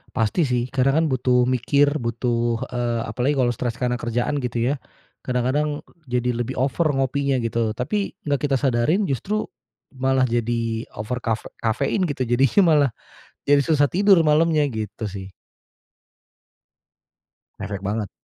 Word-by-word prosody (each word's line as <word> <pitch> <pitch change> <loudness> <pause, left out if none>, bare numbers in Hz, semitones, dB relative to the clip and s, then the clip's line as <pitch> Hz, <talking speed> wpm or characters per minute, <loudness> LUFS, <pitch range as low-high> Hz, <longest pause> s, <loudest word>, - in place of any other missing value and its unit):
Pasti 115 - +1
sih, 125 -1 0
kadang 135 +1 +2
kan - - +2
butuh 125 -1 +2
mikir, 135 +3 +2
butuh, 120 0 -1
eee, 120 -1 -1
apalagi 130 +5 0
kalau 125 -2 +2
stres 120 -1 -3
karena 125 -1 0
kerjaan 125 +5 -1
gitu 125 +1 0
ya, - - -2 0.5
kadang-kadang 135 +4 -1 0.2
jadi 125 0 0
lebih 120 +2 -3
over 140 +5 +1
ngopinya 135 0 0
gitu, 115 -1 -1
tapi 195 +10 -2
nggak 145 -1 0
kita 135 - +2
sadarin 135 - +1
justru 195 - -2 0.5
malah 130 0 +2
jadi 115 -1 -1
over 110 +4 -3
kaf 115 -2 -1 0.2
kafein 135 - 0
gitu 135 -3 -2
jadinya 130 - +3
malah, 150 -4 +4 0.6
jadi 145 0 +5
susah 145 -2 +3
tidur 195 +1 +4
malamnya, 155 0 +3
gitu 110 -1 -5
sih. 95 0 -8 2.3
Ngefek 100 -1 -5
banget. 105 +1 -2
125 Hz, 140 wpm, -22 LUFS, 115-145 Hz, 2.3 s, jadi